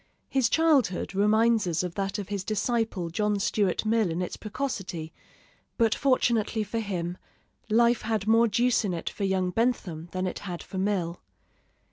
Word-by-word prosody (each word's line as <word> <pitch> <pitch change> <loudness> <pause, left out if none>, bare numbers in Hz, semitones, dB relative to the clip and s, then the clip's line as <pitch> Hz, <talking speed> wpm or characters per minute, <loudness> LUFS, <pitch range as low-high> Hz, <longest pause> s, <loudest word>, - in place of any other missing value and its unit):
His 260 -4 +2
childhood 275 - +2
reminds 220 +1 +3
us 170 0 0
of 180 -2 -4
that 195 +1 -2
of 200 -2 -6
his 200 -2 -3
disciple 215 -4 -1
John 210 +3 0
Stuart 200 -1 0
Mill 220 -3 +2
in 165 +1 -2
its 180 - -3
precocity; 195 - -4 0.6
but 225 -2 +3
fortunately 235 -5 +1
for 220 +3 -3
him, 180 -5 -3 0.5
life 235 +2 +4
had 220 -3 -1
more 225 +2 +5
juice 240 +3 +2
in 190 -4 -1
it 165 - -4
for 200 - -3
young 190 -1 0
Bentham 180 -7 -1
than 185 0 -2
it 185 - -3
had 180 -4 -6
for 190 - -6
Mill. 185 -4 -1
205 Hz, 165 wpm, -27 LUFS, 185-230 Hz, 0.6 s, more